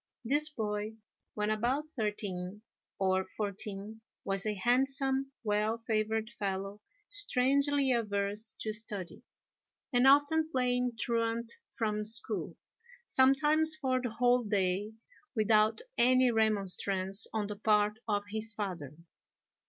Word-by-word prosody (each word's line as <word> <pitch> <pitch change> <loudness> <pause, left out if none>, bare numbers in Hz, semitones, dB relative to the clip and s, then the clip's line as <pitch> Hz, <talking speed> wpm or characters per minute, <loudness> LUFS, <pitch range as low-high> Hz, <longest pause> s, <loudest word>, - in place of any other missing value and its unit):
This 295 +5 +3
boy, 215 -5 -3 0.4
when 210 0 -1
about 250 +8 -1
thirteen 205 -3 -3 0.3
or 190 -1 +1
fourteen, 205 +2 -5 0.2
was 195 +1 -1
a 210 - -1
handsome, 270 +5 +1
well 215 +1 0
favoured 220 0 -1
fellow, 195 +1 -3 0.3
strangely 280 - +2
averse 210 -2 0
to 220 - -2
study, 210 -5 -4 0.7
and 245 +2 +4
often 290 +3 +4
playing 250 -2 0
truant 230 0 -1 0.2
from 210 -2 -1
school, 225 +2 +1 0.5
sometimes 300 - +4
for 260 -4 -1
the 245 - -2
whole 245 +2 +2
day, 205 -1 -1 0.4
without 215 0 +3 0.2
any 255 +1 +5
remonstrance 195 -2 +1
on 215 -2 -1
the 205 0 -5
part 210 0 +2
of 205 -2 0
his 220 0 0
father. 170 -9 -5
220 Hz, 115 wpm, -31 LUFS, 205-250 Hz, 0.7 s, any